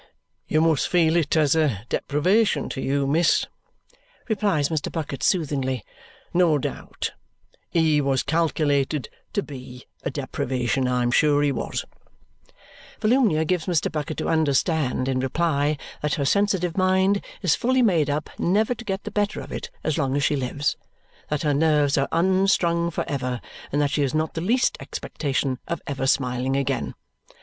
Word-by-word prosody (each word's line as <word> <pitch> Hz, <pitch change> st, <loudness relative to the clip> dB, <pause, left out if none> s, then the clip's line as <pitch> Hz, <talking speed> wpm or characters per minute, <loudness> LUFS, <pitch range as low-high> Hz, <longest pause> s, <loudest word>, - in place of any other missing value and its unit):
"You 155 Hz, -, +2 dB
must 160 Hz, -3 st, +2 dB
feel 165 Hz, -2 st, +3 dB
it 165 Hz, -2 st, +2 dB
as 150 Hz, -1 st, +4 dB
a 135 Hz, -10 st, +1 dB
deprivation 170 Hz, -, +1 dB
to 135 Hz, -, -4 dB
you, 140 Hz, +1 st, 0 dB
miss," 160 Hz, +5 st, +3 dB, 0.8 s
replies 200 Hz, -, +1 dB
Mr. 155 Hz, -3 st, -2 dB
Bucket 150 Hz, -4 st, -4 dB
soothingly, 135 Hz, -, 0 dB, 0.5 s
"no 170 Hz, -4 st, +4 dB
doubt. 135 Hz, -, -4 dB, 0.6 s
He 160 Hz, -3 st, +3 dB
was 135 Hz, -1 st, +1 dB
calculated 150 Hz, -5 st, 0 dB, 0.2 s
to 205 Hz, -, 0 dB
BE 125 Hz, -3 st, -10 dB, 0.2 s
a -, -, -2 dB
deprivation, 130 Hz, -2 st, -1 dB
I'm 125 Hz, -1 st, +1 dB
sure 145 Hz, +2 st, +4 dB
he 145 Hz, -, +2 dB
was." 135 Hz, -, -3 dB, 1.1 s
Volumnia 215 Hz, -9 st, +3 dB
gives 180 Hz, +1 st, -1 dB
Mr. 170 Hz, -4 st, +1 dB
Bucket 155 Hz, 0 st, -3 dB
to -, -, -2 dB
understand, 155 Hz, -4 st, +1 dB
in 130 Hz, -1 st, 0 dB
reply, 145 Hz, +2 st, 0 dB, 0.2 s
that 150 Hz, -1 st, 0 dB
her 140 Hz, -, -1 dB
sensitive 190 Hz, -1 st, +1 dB
mind 190 Hz, +1 st, +2 dB, 0.2 s
is 175 Hz, -5 st, +4 dB
fully 255 Hz, +1 st, +2 dB
made 170 Hz, -9 st, +3 dB
up 145 Hz, +1 st, -1 dB
never 210 Hz, +7 st, +2 dB
to 235 Hz, -, -10 dB
get 195 Hz, -2 st, -3 dB
the -, -, -6 dB
better 205 Hz, -1 st, 0 dB
of -, -, -9 dB
it -, -, -5 dB
as 155 Hz, -, 0 dB
long 135 Hz, 0 st, 0 dB
as 145 Hz, -, +1 dB
she 150 Hz, -, +2 dB
lives, 140 Hz, +2 st, -1 dB, 0.5 s
that 150 Hz, +1 st, -1 dB
her 150 Hz, -1 st, +2 dB
nerves 150 Hz, -1 st, +3 dB
are 135 Hz, -1 st, +1 dB
unstrung 170 Hz, -1 st, +2 dB
for 170 Hz, -, -3 dB
ever, 125 Hz, -3 st, -2 dB, 0.3 s
and 145 Hz, -, 0 dB
that 145 Hz, -1 st, +1 dB
she 150 Hz, -, 0 dB
has 140 Hz, +1 st, 0 dB
not 155 Hz, 0 st, 0 dB
the 165 Hz, -, -3 dB
least 240 Hz, +7 st, +2 dB
expectation 135 Hz, -3 st, -3 dB
of 170 Hz, -, -2 dB
ever 135 Hz, -1 st, -2 dB
smiling 130 Hz, 0 st, +1 dB
again. 135 Hz, -2 st, -1 dB
150 Hz, 160 wpm, -24 LUFS, 140-170 Hz, 1.1 s, as